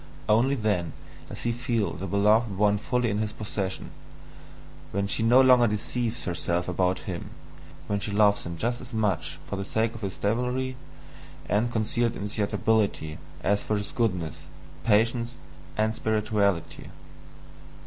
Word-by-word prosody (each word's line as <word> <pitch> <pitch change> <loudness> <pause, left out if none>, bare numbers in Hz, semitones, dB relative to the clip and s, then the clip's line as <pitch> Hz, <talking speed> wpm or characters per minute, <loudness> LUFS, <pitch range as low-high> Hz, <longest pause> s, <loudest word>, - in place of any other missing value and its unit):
Only 120 +6 +4
then 105 -8 0 0.4
does - - -6
he 120 - +1
feel 115 -2 -1
the 95 - -5
beloved 105 +2 +3
one 105 0 +3
fully 125 +1 0
in 105 - -1
his 110 -1 -1
possession, 100 -3 -4 1.0
when 100 +1 0
she 100 - 0
no 120 +3 +6
longer 125 -2 +6
deceives 115 +3 -2
herself 90 -1 -1
about 90 +1 +1
him, - - -5 0.6
when 100 0 -1
she 100 - -4
loves 105 0 +3
him 85 0 -6
just 120 +6 -1
as 125 -1 -8
much 95 -8 0
for 100 - -4
the 100 - -2
sake 110 +3 0
of 115 - -9
his 95 -3 -4
devilry 125 +4 -1 0.7
and 110 +5 +1
concealed 115 +1 0
insatiability, 105 -5 0 0.2
as 100 +1 +2
for 105 - -1
his 100 - -4
goodness, 90 -9 -1 0.5
patience, 115 +2 +2 0.4
and 110 +1 +2
spirituality. 105 -5 0
105 Hz, 145 wpm, -27 LUFS, 100-115 Hz, 1.0 s, no